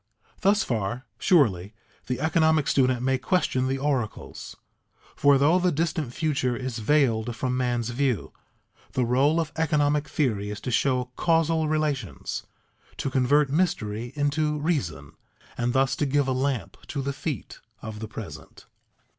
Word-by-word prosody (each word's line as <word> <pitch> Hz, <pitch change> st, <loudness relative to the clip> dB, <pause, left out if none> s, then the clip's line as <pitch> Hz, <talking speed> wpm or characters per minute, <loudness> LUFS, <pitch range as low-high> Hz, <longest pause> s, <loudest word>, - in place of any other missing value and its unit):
Thus 205 Hz, +2 st, +3 dB
far, 120 Hz, +2 st, -2 dB
surely, 110 Hz, -, +3 dB, 0.3 s
the 125 Hz, -1 st, -2 dB
economic 160 Hz, -2 st, +3 dB
student 130 Hz, -2 st, +2 dB
may 130 Hz, 0 st, +1 dB
question 130 Hz, -3 st, +1 dB
the 135 Hz, +1 st, 0 dB
oracles; 135 Hz, -6 st, -3 dB, 0.6 s
for 140 Hz, -1 st, +5 dB
though 155 Hz, +7 st, +4 dB
the 180 Hz, 0 st, +2 dB
distant 155 Hz, -4 st, -1 dB
future 135 Hz, -4 st, 0 dB
is 130 Hz, -3 st, -4 dB
veiled 120 Hz, -2 st, +2 dB
from 125 Hz, +1 st, -1 dB
man's 120 Hz, -2 st, 0 dB
view, 125 Hz, -4 st, -1 dB, 0.6 s
the 125 Hz, -, +1 dB
role 135 Hz, +7 st, +3 dB
of 160 Hz, -2 st, -2 dB
economic 150 Hz, -2 st, +1 dB
theory 105 Hz, -9 st, 0 dB
is 105 Hz, -, -5 dB
to 125 Hz, -, -3 dB
show 125 Hz, 0 st, +1 dB
causal 165 Hz, -1 st, +2 dB
relations, 150 Hz, -, -2 dB, 0.5 s
to 135 Hz, -, -2 dB
convert 135 Hz, +2 st, +3 dB
mystery 120 Hz, -, -1 dB
into 150 Hz, +1 st, 0 dB
reason, 105 Hz, -, -2 dB, 0.4 s
and 120 Hz, 0 st, 0 dB
thus 135 Hz, +1 st, +2 dB
to 145 Hz, -, 0 dB
give 140 Hz, 0 st, +1 dB
a -, -, +1 dB
lamp 130 Hz, -2 st, -1 dB
to 140 Hz, -3 st, -3 dB
the 140 Hz, +1 st, -2 dB
feet 140 Hz, -, -5 dB, 0.2 s
of 110 Hz, -1 st, -6 dB
the 110 Hz, -, -5 dB
present. 80 Hz, -8 st, -9 dB
135 Hz, 145 wpm, -26 LUFS, 120-150 Hz, 0.6 s, for